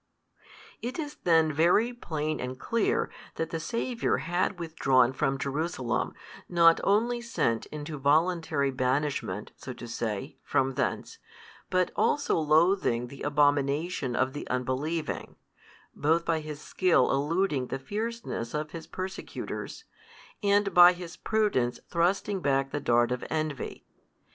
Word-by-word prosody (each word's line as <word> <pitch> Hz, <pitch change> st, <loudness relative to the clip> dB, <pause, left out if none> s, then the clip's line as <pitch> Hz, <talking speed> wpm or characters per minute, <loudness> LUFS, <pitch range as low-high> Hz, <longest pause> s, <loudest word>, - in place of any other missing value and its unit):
It 245 Hz, +2 st, -4 dB
is 300 Hz, -2 st, -5 dB
then 160 Hz, -3 st, +4 dB
very 180 Hz, +10 st, +3 dB
plain 155 Hz, -9 st, -3 dB
and 130 Hz, +1 st, -5 dB
clear, 230 Hz, -2 st, 0 dB, 0.2 s
that 165 Hz, -, -3 dB
the 165 Hz, -, -2 dB
Saviour 235 Hz, +6 st, -1 dB
had 175 Hz, +3 st, -1 dB
withdrawn 135 Hz, -6 st, +2 dB
from 135 Hz, 0 st, 0 dB
Jerusalem, 140 Hz, -3 st, -2 dB, 0.3 s
not 170 Hz, -1 st, +5 dB
only 235 Hz, +4 st, +2 dB
sent 115 Hz, -, -1 dB
into 150 Hz, 0 st, -6 dB
voluntary 155 Hz, -1 st, +2 dB
banishment, 130 Hz, -6 st, -1 dB
so 130 Hz, -, -7 dB
to 120 Hz, -, -9 dB
say, 110 Hz, -3 st, -4 dB
from 135 Hz, 0 st, +1 dB
thence, -, -, -2 dB, 0.5 s
but 185 Hz, -1 st, +1 dB
also 290 Hz, -, +2 dB
loathing 155 Hz, -6 st, +2 dB
the 140 Hz, -, -11 dB
abomination 145 Hz, -1 st, +1 dB
of 130 Hz, +1 st, +1 dB
the 145 Hz, -, -6 dB
unbelieving, 135 Hz, +6 st, -2 dB, 0.6 s
both 165 Hz, +3 st, +1 dB
by 165 Hz, -1 st, +1 dB
His 150 Hz, -1 st, -7 dB
skill 175 Hz, -4 st, +2 dB
eluding 145 Hz, -1 st, 0 dB
the 135 Hz, -, -3 dB
fierceness 205 Hz, -, -4 dB
of 150 Hz, 0 st, -3 dB
His 165 Hz, -2 st, -8 dB
persecutors, 190 Hz, -, -6 dB, 0.6 s
and 200 Hz, -1 st, +2 dB
by 175 Hz, 0 st, +9 dB
His 175 Hz, -2 st, -8 dB
prudence 205 Hz, -, 0 dB
thrusting 190 Hz, +4 st, +1 dB
back 135 Hz, -2 st, +1 dB
the 145 Hz, -, -2 dB
dart 120 Hz, -3 st, +2 dB
of 125 Hz, -, -2 dB
envy. 155 Hz, -4 st, -3 dB
155 Hz, 130 wpm, -28 LUFS, 135-180 Hz, 0.6 s, by